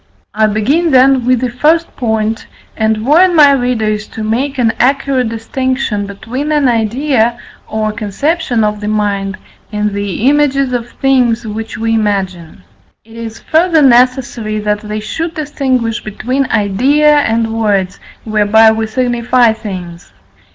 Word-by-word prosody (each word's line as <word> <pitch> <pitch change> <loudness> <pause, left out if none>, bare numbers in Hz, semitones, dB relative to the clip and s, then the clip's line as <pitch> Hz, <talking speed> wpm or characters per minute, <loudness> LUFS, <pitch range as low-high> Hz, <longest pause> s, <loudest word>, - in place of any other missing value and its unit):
I 215 0 +2
begin, 270 +12 +1
then, 260 -2 +4
with 255 -1 +2
the 250 -2 -1
first 315 +7 +1
point, 220 -2 -2 0.3
and 220 0 -1
warn 345 +6 +4
my 295 -3 +7
readers 220 -5 -1
to 220 - -7
make 255 +6 -2
an 230 -3 +1
accurate 265 -1 +1
distinction 230 -2 -2
between 255 +9 -5
an 295 -3 +2
idea, 235 +1 +1 0.3
or 215 0 -2
conception 230 - -1
of 210 0 -1
the 210 - -4
mind, 200 -2 -1 0.3
and 210 0 -1
the 200 +3 -2
images 275 -2 +2
of 240 -1 -3
things 250 -4 +1
which 220 0 -6
we 225 +1 -1
imagine. 190 - -2 0.4
It 225 0 -16
is 230 -1 -8
further 325 -1 +2
necessary 245 -4 +2
that 210 0 -1
they 215 0 -5
should 325 +10 -4
distinguish 260 -7 -2
between 255 +6 -2
idea 265 +9 +2
and 225 -3 0
words, 205 -4 -1 0.2
whereby 215 +1 +4
we 220 0 -2
signify 240 0 +1
things. 180 -5 -8
230 Hz, 140 wpm, -13 LUFS, 215-265 Hz, 0.4 s, my